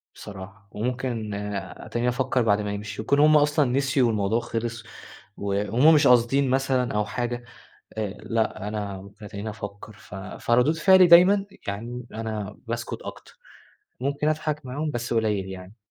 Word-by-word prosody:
بصراحة. 100 +1 -10
وممكن 120 -2 -3
أ 100 -2 -5
أتَنيني 120 +1 -1
أفكر 130 +1 0
بعد 105 -2 +2
ما 105 -1 -3
يمشوا، 105 +1 -5
يكون 140 +5 +2
هم 150 +1 +6
أصلًا 145 0 +3
نسيوا 135 -1 +2
والموضوع 110 +1 +1
خلص، 115 0 -4 0.5
وهم 105 +9 +3
مش 150 - +5
قاصدين 125 +2 +4
مثلًا 130 -2 +1
أو 105 - +1
حاجة، 120 +2 -3 0.6
آآ، 105 - -1
لأ، 110 -2 -1
أنا 100 -2 -5
باتَنيني 105 +1 -6
أفكر. 105 0 -8
ف 100 - -14
فردود 120 +9 +1
فعلي 190 +1 +6
دايمًا 190 +4 +6 0.2
يعني 120 +4 -5
أنا 110 -3 -4
باسكت - - -4
أكتر، - - -10 0.6
ممكن 140 +3 -1
أضحك 155 -1 -2
معاهم، 150 +4 -3
بس 120 -2 -3
قليل 105 -4 0
يعني. 95 +3 -9
115 Hz, 145 wpm, -25 LUFS, 105-135 Hz, 0.6 s, هم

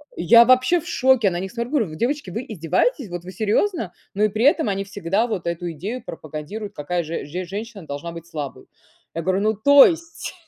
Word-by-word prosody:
я 230 +7 +6
вообще 255 +7 +4
в - - -11
шоке. 255 -6 +3
На 175 - -2
них 190 +1 -5
смотрю, 235 +2 -4
говорю: 215 - 0
"Девочки, 255 - -2
вы 230 +8 -5
издеваетесь? 205 - 0
Вот, 175 0 -6
вы 185 - -8
серьёзно?" 215 - 0 0.2
Ну, 205 +2 0
и 215 - +4
при 220 +5 0
этом 300 - +4
они 195 0 -1
всегда 200 +3 -1
вот 185 -7 -4
эту 170 0 -3
идею 200 - -5
пропагандируют, 165 +7 -7
какая 170 +4 -2
же 165 +1 -5
же 180 +5 -5
женщина 205 +1 -7
должна 145 +4 -5
быть 170 0 -10
слабой. 150 -4 -7 0.5
Я 165 - -2
говорю: 190 +2 +1
"Ну, 215 +1 +2
то 285 +6 +8
есть?" 330 -1 -3
200 Hz, 205 wpm, -22 LUFS, 170-240 Hz, 0.5 s, то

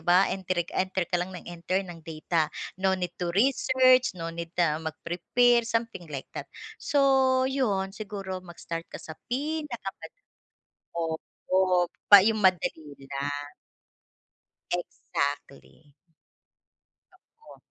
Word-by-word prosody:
ba? 175 +4 +5
Entry 185 -2 -1
enter 185 -1 0
ka 175 0 0
lang 180 - -2
nang - - -10
enter 175 +3 -2
ng 175 -2 -9
data. 160 0 -1 0.3
No 190 0 +3
need 180 -2 -3
to 175 - 0
research, 255 -1 +4
no 165 -1 -4
need 170 0 -5
na 160 -3 +2
mag-prepare 230 +9 +1
something 230 -7 -2
like 140 -3 -6
that, - - -6 0.3
so, 265 -2 +3
'yon 210 -8 0
siguro 195 -3 -5
mag-start 170 -1 -7
ka - - -7
sa 160 - -9 0.2
pinakamada 290 - -4 0.7
opo, 175 +2 0 0.2
pa 200 - +13
yung 215 0 +2
madali 160 -5 +2 0.2
lang. 145 +1 -3 1.2
Exactly. 145 -3 -4 1.2
Totoo. 455 - -19
185 Hz, 115 wpm, -27 LUFS, 165-230 Hz, 1.2 s, pa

